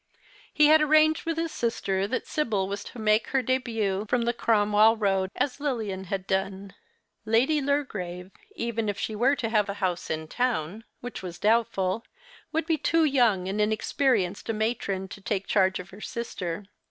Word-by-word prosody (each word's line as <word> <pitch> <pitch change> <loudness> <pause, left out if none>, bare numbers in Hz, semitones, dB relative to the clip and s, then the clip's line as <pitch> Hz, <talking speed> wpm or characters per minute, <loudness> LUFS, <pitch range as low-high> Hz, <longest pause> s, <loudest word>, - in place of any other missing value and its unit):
He 300 - +4
had 310 +1 +6
arranged 310 +1 +4
with 330 -1 -1
his 330 -1 -1
sister 195 -4 -1
that 255 - -2
Sibyl 215 -11 -1
Avas 200 +1 -4
to - - -12
make 215 0 +2
her 265 -1 +1
dehut 225 -5 -1
from 245 -1 +2
the 235 +1 +1
Cromwell 215 -1 +4
Eoad 195 -3 +1
as 280 0 -1
Lilian 220 -10 -2
had 190 +1 -3
done. 195 0 -2 0.5
Lady 260 +7 +2
Lurgrave, 195 -11 -2 0.2
even 230 -2 -2
if 205 - -2
she 220 - -3
;were 255 +6 +3
to 230 -5 -2
have 210 -3 +2
a 200 - -3
house 185 -4 -2
in 160 0 -3
town, 220 -2 -2 0.2
which 245 -2 -6
was 175 -2 -7
doubtful, 215 -2 +1 0.5
would 320 0 0
be 325 -1 +1
too 330 +3 +3
young 235 -10 +2
and 200 +2 -1
inexperienced 215 -2 0
a - - +1
matron 215 -3 -2
to 195 - -10
take 195 -1 -2
charge 190 -2 +2
of 185 - -9
her 200 +3 -12
sister. 195 -6 -5
215 Hz, 175 wpm, -27 LUFS, 195-250 Hz, 0.5 s, had